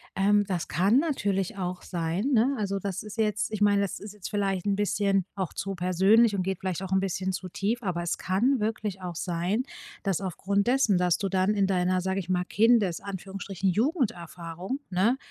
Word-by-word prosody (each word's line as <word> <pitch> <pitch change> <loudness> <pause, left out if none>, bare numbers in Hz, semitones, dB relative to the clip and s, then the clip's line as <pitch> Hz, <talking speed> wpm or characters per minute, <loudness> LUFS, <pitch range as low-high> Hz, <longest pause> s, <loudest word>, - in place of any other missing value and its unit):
ähm, 205 +1 +3
das 180 -4 -2
kann 195 - +3
natürlich 205 - -1
auch 180 -1 -3
sein, 170 +3 -2
ne, 255 +3 +3
also, 200 -1 -1
das 195 -1 -3
ist 210 +1 -9
jetzt 215 -1 +1
ich 215 - -3
meine, 205 -1 +4
das 200 - -2
ist 205 0 -9
jetzt 210 -3 -7
vielleicht 195 -2 -1
'n 200 - +2
bisschen 200 -2 +1
auch 190 -4 -2
zu 195 0 -3
persönlich 195 +5 +4
und 185 - 0
geht 190 -1 -2
vielleicht 185 0 -3
auch 190 - -6
'n 190 - +4
bisschen 190 0 -2
zu 185 0 -5
tief, 220 +7 -1
aber 175 -4 -2
es 170 - -2
kann 235 +8 +2
wirklich 210 -3 -2
auch 180 -2 -5
sein, 180 +7 -1 0.4
dass 195 -4 0
aufgrund 200 +3 -1
dessen, 245 -7 +3
dass 180 -1 +3
du 195 - -2
dann 190 +2 +1
in 200 - +3
deiner, 185 -1 +1
sage 190 +1 -1
ich 185 -1 -7
mal, 180 -1 +1
Kindes 210 -4 +3
Anführungsstrichen 195 -1 -3
Jugenderfahrung, 190 - -2
ne, 210 +9 +2
195 Hz, 200 wpm, -27 LUFS, 185-210 Hz, 0.4 s, meine